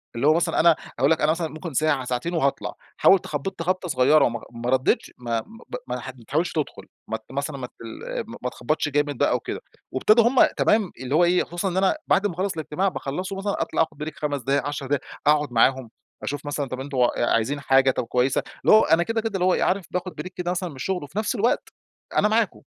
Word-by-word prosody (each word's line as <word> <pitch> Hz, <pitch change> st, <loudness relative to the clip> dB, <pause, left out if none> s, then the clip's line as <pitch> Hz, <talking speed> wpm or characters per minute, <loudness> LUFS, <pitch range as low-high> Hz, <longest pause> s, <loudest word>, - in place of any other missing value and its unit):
اللي 120 Hz, +5 st, +1 dB
هو 155 Hz, -, +7 dB
مثلًا 170 Hz, +1 st, +1 dB
أنا 165 Hz, 0 st, +6 dB, 0.2 s
هاقول 135 Hz, +4 st, +4 dB
لك 160 Hz, -, +2 dB
أنا 150 Hz, -, +4 dB
مثلًا 165 Hz, 0 st, -1 dB
ممكن 155 Hz, +1 st, -7 dB
ساعة 145 Hz, -2 st, +1 dB
ساعتين 125 Hz, +7 st, -2 dB
وهاطلع، 140 Hz, -4 st, 0 dB, 0.2 s
حاول 195 Hz, -, +6 dB
تخبط 165 Hz, +4 st, -5 dB
خبطة 185 Hz, +1 st, -1 dB
صغيرة 145 Hz, +2 st, +5 dB
وما 120 Hz, -1 st, -2 dB
ما 120 Hz, +1 st, -4 dB
ردتش 130 Hz, 0 st, +1 dB
ما 120 Hz, -2 st, -2 dB
ب -, -, -9 dB, 0.2 s
ب -, -, -5 dB
ما -, -, -2 dB
تح -, -, -7 dB
ما 120 Hz, -, -15 dB
تحاولش 160 Hz, +5 st, 0 dB
تدخل 155 Hz, -3 st, -3 dB, 0.2 s
مت 110 Hz, 0 st, -4 dB
مثلًا 140 Hz, +1 st, -3 dB
ما 125 Hz, -2 st, -5 dB
تل 115 Hz, -2 st, -11 dB
آآ -, -, -2 dB, 0.2 s
ما -, -, 0 dB
تخبطش 155 Hz, +3 st, -1 dB
جامد 145 Hz, -1 st, 0 dB
بقى -, -, +2 dB
وكده، -, -, -4 dB, 0.3 s
وابتدوا 215 Hz, -, +4 dB
هم 260 Hz, +2 st, +6 dB
تمام 210 Hz, -4 st, +2 dB
اللي 130 Hz, +2 st, -2 dB
هو 175 Hz, -, +5 dB
إيه، 175 Hz, +1 st, +3 dB
خصوصًا 175 Hz, +3 st, -3 dB
إن 180 Hz, -, -3 dB
أنا 190 Hz, +8 st, +3 dB
بعد 205 Hz, -, +3 dB
ما 190 Hz, -, -5 dB
أخلص 190 Hz, +3 st, -1 dB
الاجتماع 160 Hz, +4 st, -1 dB
باخلصه 185 Hz, +2 st, -3 dB
مثلًا 200 Hz, +1 st, -2 dB
أطلع -, -, 0 dB
أخد 155 Hz, -2 st, -2 dB
Break 155 Hz, 0 st, -5 dB
5 145 Hz, -2 st, -2 dB
دقايق 140 Hz, +3 st, 0 dB
10 145 Hz, -1 st, -4 dB
دقايق، 140 Hz, -1 st, 0 dB, 0.3 s
أقعد 150 Hz, -2 st, +3 dB
معاهم 125 Hz, +1 st, +3 dB, 0.3 s
أشوف 145 Hz, +1 st, -4 dB
مثلًا 145 Hz, -1 st, -2 dB
طب 130 Hz, -, -5 dB
أنتم 135 Hz, 0 st, -5 dB
آآ 120 Hz, -1 st, +2 dB
عايزين 130 Hz, +6 st, 0 dB
حاجة؟ 135 Hz, -1 st, +4 dB
طب -, -, -2 dB
كويسة 125 Hz, +2 st, +1 dB, 0.2 s
اللي -, -, +7 dB
هو 215 Hz, -, +7 dB
أنا 165 Hz, +2 st, +4 dB
كده 225 Hz, +4 st, -1 dB
كده 225 Hz, 0 st, -2 dB
اللي 180 Hz, -1 st, +1 dB
هو 185 Hz, -, +4 dB
إيه -, -, +1 dB
عارف 190 Hz, -1 st, +1 dB
باخد 180 Hz, 0 st, -4 dB
Break -, -, -6 dB
كده 175 Hz, 0 st, -2 dB
مثلًا 180 Hz, 0 st, -2 dB
من 145 Hz, -, -11 dB
الشغل، 180 Hz, +6 st, -2 dB
وفي 145 Hz, +7 st, -10 dB
نفس 220 Hz, +4 st, -1 dB
الوقت 230 Hz, +2 st, +1 dB, 0.5 s
أنا -, -, +5 dB
معاكم، 220 Hz, -2 st, +1 dB
150 Hz, 235 wpm, -24 LUFS, 135-180 Hz, 0.5 s, هو